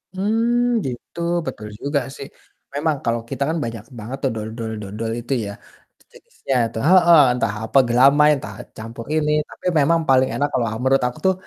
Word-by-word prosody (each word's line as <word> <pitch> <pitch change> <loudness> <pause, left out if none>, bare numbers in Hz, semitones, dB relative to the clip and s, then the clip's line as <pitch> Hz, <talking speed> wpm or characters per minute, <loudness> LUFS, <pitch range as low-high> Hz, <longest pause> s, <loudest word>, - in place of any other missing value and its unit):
Mmm, 230 +3 +1
gitu, 125 +6 -7 0.3
betul 105 0 -6
juga 145 +1 0 0.2
sih. 140 - -8 0.5
Memang 150 +1 +1
kalau 115 0 0
kita 140 - -2
kan 165 - -1
banyak 115 -2 -5 0.2
banget 120 +6 -6
tuh 135 - +1
dodol-dodol 110 -1 -5
itu 120 +3 -3
ya, - - -5 0.5
sejenisnya 135 - -7
itu, 115 - -9
heeh, 175 -3 +7
entah 115 -4 -1
apa 135 - 0
gelamai, 140 +5 +5
entah 100 -7 -7 0.2
campur 115 +1 -8
ini. 150 -1 +1 0.2
Tapi - - -15
memang 165 +4 +3
paling 130 0 +4
enak 145 - +1
kalau, 120 -3 +1
eee, 110 +1 -4
menurut 135 0 +3
aku 125 - -6
tuh 190 - +4
130 Hz, 175 wpm, -21 LUFS, 115-155 Hz, 0.5 s, heeh